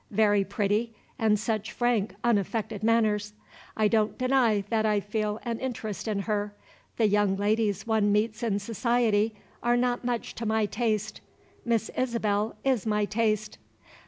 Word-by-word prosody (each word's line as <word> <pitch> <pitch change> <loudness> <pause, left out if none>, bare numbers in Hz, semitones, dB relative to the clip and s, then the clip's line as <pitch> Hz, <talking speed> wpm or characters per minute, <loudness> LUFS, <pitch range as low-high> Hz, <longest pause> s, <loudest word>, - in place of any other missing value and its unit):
Very 205 -1 +3
pretty, 210 +3 -1 0.2
and 215 -2 +3
such 220 +1 -2
frank, 230 -6 0
unaffected 215 -1 0
manners. 215 -2 +2 0.4
I 215 -1 +4
don't 215 -1 +1
deny 255 -5 +2
that 225 -2 +1
I 210 -1 +2
feel 210 +1 -2
an 230 -1 -2
interest 220 -6 -4
in 205 -2 -1
her. 205 0 -2 0.4
The 225 - +3
young 205 -1 +2
ladies 210 -1 0
one 220 -2 +2
meets 215 +2 0
in 220 -4 0
society 225 0 +1 0.3
are 240 0 +2
not 245 0 0
much 240 -1 -2
to 230 - -4
my 220 0 +2
taste. 215 -1 -2 0.4
Miss 230 -2 0
Isabel 220 -4 0
is 255 -5 +1
my 210 -1 +1
taste." 215 0 -1
215 Hz, 150 wpm, -27 LUFS, 210-230 Hz, 0.4 s, I